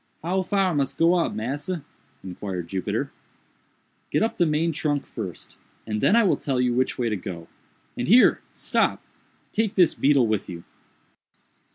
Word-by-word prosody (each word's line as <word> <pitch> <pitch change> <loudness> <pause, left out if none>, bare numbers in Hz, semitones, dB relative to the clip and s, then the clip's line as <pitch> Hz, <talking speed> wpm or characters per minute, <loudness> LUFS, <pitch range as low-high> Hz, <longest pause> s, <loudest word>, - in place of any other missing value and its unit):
"How 185 +3 0
far 190 -1 +1
mus 140 -3 0
go 165 +1 +4
up, 175 -2 +1
massa?" 145 +8 -4 0.4
inquired 90 -1 -5
Jupiter. 95 -2 -2 1.0
"Get - - +1
up 225 - -2
the 175 - +4
main 155 +2 +1
trunk 145 -2 -1
first, 95 -8 -8 0.3
and 105 -1 -3
then 210 - +4
I 235 - +5
will 195 - +2
tell 135 -3 -2
you 125 -1 +2
which 130 +1 0
way 120 - 0
to 110 - 0
go—and 90 -4 -9
here—stop! 240 +6 +3 0.5
take 220 -1 0
this 180 -4 +5
beetle 140 -3 +3
with 110 -2 -1
you." 85 -2 -7
140 Hz, 155 wpm, -24 LUFS, 105-175 Hz, 1.0 s, I